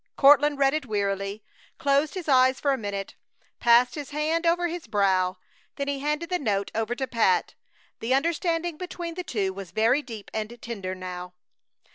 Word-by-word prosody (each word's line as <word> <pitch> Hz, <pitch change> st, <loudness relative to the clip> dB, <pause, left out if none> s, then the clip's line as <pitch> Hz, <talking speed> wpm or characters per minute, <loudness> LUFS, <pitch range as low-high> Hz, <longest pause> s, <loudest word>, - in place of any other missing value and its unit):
Courtland 290 Hz, +1 st, +6 dB
read 275 Hz, -1 st, +3 dB
it 305 Hz, -4 st, -2 dB
wearily, 200 Hz, -1 st, -2 dB, 0.3 s
closed 285 Hz, 0 st, +1 dB
his 365 Hz, -4 st, -5 dB
eyes 260 Hz, -1 st, +4 dB
for 285 Hz, -, +1 dB
a -, -, +2 dB
minute, 200 Hz, -3 st, -4 dB, 0.5 s
passed 240 Hz, +1 st, +5 dB
his 290 Hz, -3 st, -6 dB
hand 315 Hz, +3 st, 0 dB
over 350 Hz, +1 st, +2 dB
his 340 Hz, -5 st, -6 dB
brow, 190 Hz, -3 st, +2 dB, 0.4 s
then 280 Hz, -, -3 dB
he 285 Hz, -1 st, -1 dB
handed 300 Hz, +4 st, -1 dB
the 360 Hz, -, +1 dB
note 200 Hz, -6 st, -1 dB
over 225 Hz, +2 st, -1 dB
to 265 Hz, -, -2 dB
Pat. 225 Hz, -7 st, +1 dB, 0.5 s
The 245 Hz, +3 st, +1 dB
understanding 335 Hz, +2 st, 0 dB
between 350 Hz, -1 st, -5 dB
the 360 Hz, +2 st, -5 dB
two 200 Hz, -, -1 dB
was 195 Hz, -2 st, -8 dB
very 230 Hz, -, +2 dB
deep 225 Hz, -7 st, -9 dB
and 220 Hz, +2 st, -4 dB
tender 195 Hz, -6 st, -5 dB
now. 180 Hz, -1 st, -7 dB
255 Hz, 175 wpm, -26 LUFS, 205-300 Hz, 0.5 s, Courtland